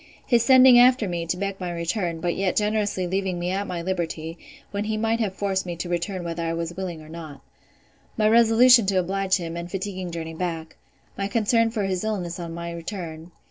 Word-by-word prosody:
His 240 Hz, -2 st, +3 dB
sending 255 Hz, 0 st, +7 dB
after 250 Hz, -3 st, +5 dB
me, 170 Hz, -2 st, -3 dB
to 180 Hz, -, -1 dB
beg 195 Hz, 0 st, -3 dB
my 180 Hz, -2 st, -3 dB
return; 170 Hz, 0 st, -2 dB
but 175 Hz, 0 st, -1 dB
yet 195 Hz, -1 st, 0 dB
generously 210 Hz, -3 st, 0 dB
leaving 190 Hz, 0 st, -1 dB
me 175 Hz, +1 st, -2 dB
at 200 Hz, +2 st, -2 dB
my 170 Hz, -2 st, -4 dB
liberty, 165 Hz, -3 st, -3 dB, 0.4 s
when 200 Hz, +1 st, -2 dB
he 215 Hz, 0 st, -1 dB
might 225 Hz, +1 st, 0 dB
have 205 Hz, -4 st, -1 dB
forced 195 Hz, -1 st, -1 dB
me 175 Hz, -2 st, -5 dB
to 175 Hz, +2 st, -5 dB
return 175 Hz, +2 st, -2 dB
whether 170 Hz, 0 st, -4 dB
I 165 Hz, 0 st, -1 dB
was 165 Hz, 0 st, -3 dB
willing 175 Hz, -4 st, -5 dB
or -, -, -14 dB
not. 155 Hz, -4 st, -9 dB, 0.8 s
My 215 Hz, -1 st, +3 dB
resolution 230 Hz, 0 st, +6 dB
to 195 Hz, -1 st, +1 dB
oblige 190 Hz, +1 st, 0 dB
him, 170 Hz, -2 st, -5 dB
and 170 Hz, 0 st, -5 dB
fatiguing 190 Hz, -1 st, -4 dB
journey 165 Hz, -1 st, -5 dB
back. 165 Hz, -2 st, -4 dB, 0.4 s
My 195 Hz, -, 0 dB
concern 230 Hz, +2 st, +2 dB
for 220 Hz, -2 st, -2 dB
his 190 Hz, -1 st, -1 dB
illness 185 Hz, -5 st, -3 dB
on 170 Hz, -1 st, -5 dB
my 170 Hz, 0 st, -5 dB
return. 165 Hz, -2 st, -7 dB
185 Hz, 210 wpm, -24 LUFS, 170-210 Hz, 0.8 s, sending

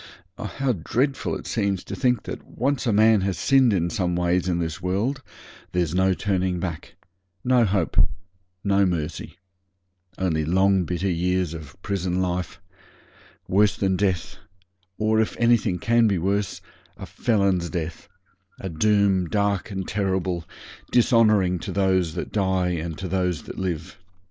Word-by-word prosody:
Oh! -, -, -7 dB
how 135 Hz, -2 st, -1 dB
dreadful 125 Hz, -, -1 dB
it -, -, -7 dB
seems 100 Hz, -4 st, -1 dB
to -, -, -6 dB
think 125 Hz, -4 st, +1 dB
that -, -, -7 dB
when -, -, -19 dB
once 135 Hz, +1 st, 0 dB
a -, -, +3 dB
man 110 Hz, 0 st, +5 dB
has 95 Hz, -3 st, -1 dB
sinned 130 Hz, -, +4 dB
in 85 Hz, -3 st, 0 dB
some 90 Hz, -6 st, -1 dB
ways 90 Hz, +1 st, +1 dB
in 85 Hz, -, +1 dB
this 80 Hz, 0 st, -3 dB
world 105 Hz, +10 st, -1 dB, 0.5 s
there's 85 Hz, -3 st, 0 dB
no 95 Hz, +1 st, +2 dB
turning 95 Hz, -3 st, -1 dB
back 85 Hz, -3 st, -5 dB, 0.5 s
no 125 Hz, -2 st, +4 dB
hope 95 Hz, -5 st, +2 dB, 0.5 s
no 100 Hz, 0 st, +3 dB
mercy 85 Hz, -4 st, -3 dB, 0.8 s
only 85 Hz, -4 st, 0 dB
long 95 Hz, +3 st, +3 dB
bitter 90 Hz, +3 st, -2 dB
years 90 Hz, -1 st, 0 dB
of 80 Hz, 0 st, -10 dB
prison 95 Hz, -2 st, -1 dB
life 90 Hz, -1 st, -2 dB, 0.9 s
worse 100 Hz, +2 st, +3 dB
than 95 Hz, -1 st, +1 dB
death; 95 Hz, -2 st, -1 dB, 0.6 s
or, 110 Hz, 0 st, +2 dB
if 110 Hz, -, -2 dB
anything 115 Hz, -6 st, +3 dB
can 115 Hz, +3 st, +3 dB
be 100 Hz, -3 st, +1 dB
worse, 100 Hz, +3 st, -1 dB, 0.4 s
a -, -, -7 dB
felon's 100 Hz, -7 st, 0 dB
death; 85 Hz, -2 st, -5 dB, 0.5 s
a 95 Hz, -, -5 dB
doom 95 Hz, 0 st, +2 dB
dark 100 Hz, -2 st, 0 dB
and 95 Hz, -3 st, -4 dB
terrible, 95 Hz, -3 st, -1 dB, 0.5 s
dishonouring 110 Hz, -7 st, +4 dB
to -, -, -5 dB
those 95 Hz, -4 st, +1 dB
that -, -, -4 dB
die 95 Hz, -3 st, +1 dB
and 85 Hz, -2 st, -3 dB
to 95 Hz, +1 st, -5 dB
those 90 Hz, -3 st, -1 dB
that -, -, -8 dB
live. 90 Hz, -1 st, -4 dB
95 Hz, 155 wpm, -24 LUFS, 90-105 Hz, 0.9 s, man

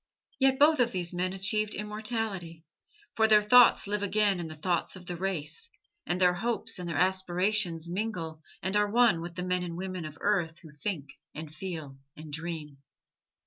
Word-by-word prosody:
Yet 265 Hz, -1 st, +4 dB
both 305 Hz, +1 st, +5 dB
of 240 Hz, -1 st, +3 dB
these 180 Hz, -1 st, -2 dB
men 180 Hz, +1 st, -1 dB
achieved 210 Hz, +3 st, -1 dB
immortality, 210 Hz, -6 st, -3 dB, 0.5 s
for 220 Hz, 0 st, +4 dB
their 210 Hz, -1 st, +6 dB
thoughts 245 Hz, +3 st, +6 dB
live 205 Hz, 0 st, -2 dB
again 205 Hz, -1 st, +2 dB
in 170 Hz, -, -4 dB
the 155 Hz, -, -8 dB
thoughts 175 Hz, +4 st, -1 dB
of 185 Hz, -1 st, -11 dB
the 175 Hz, -, -4 dB
race, 165 Hz, -4 st, -3 dB, 0.4 s
and 175 Hz, +2 st, 0 dB
their 180 Hz, -1 st, +5 dB
hopes 225 Hz, +2 st, -1 dB
and 175 Hz, -1 st, -5 dB
their 160 Hz, -, -2 dB
aspirations 185 Hz, -1 st, +1 dB
mingle 175 Hz, -5 st, -3 dB, 0.2 s
and 190 Hz, +2 st, -1 dB
are 210 Hz, 0 st, +3 dB
one 230 Hz, -6 st, +4 dB
with 170 Hz, 0 st, -7 dB
the 180 Hz, -, -3 dB
men 180 Hz, 0 st, 0 dB
and 170 Hz, -1 st, -5 dB
women 185 Hz, -2 st, -4 dB
of 150 Hz, -1 st, -8 dB
earth 175 Hz, -5 st, 0 dB
who 160 Hz, -, -12 dB
think 150 Hz, -2 st, -5 dB, 0.2 s
and 155 Hz, 0 st, -7 dB
feel 155 Hz, -5 st, -6 dB, 0.2 s
and 155 Hz, -1 st, -10 dB
dream. 155 Hz, -3 st, -5 dB
180 Hz, 185 wpm, -29 LUFS, 165-210 Hz, 0.5 s, their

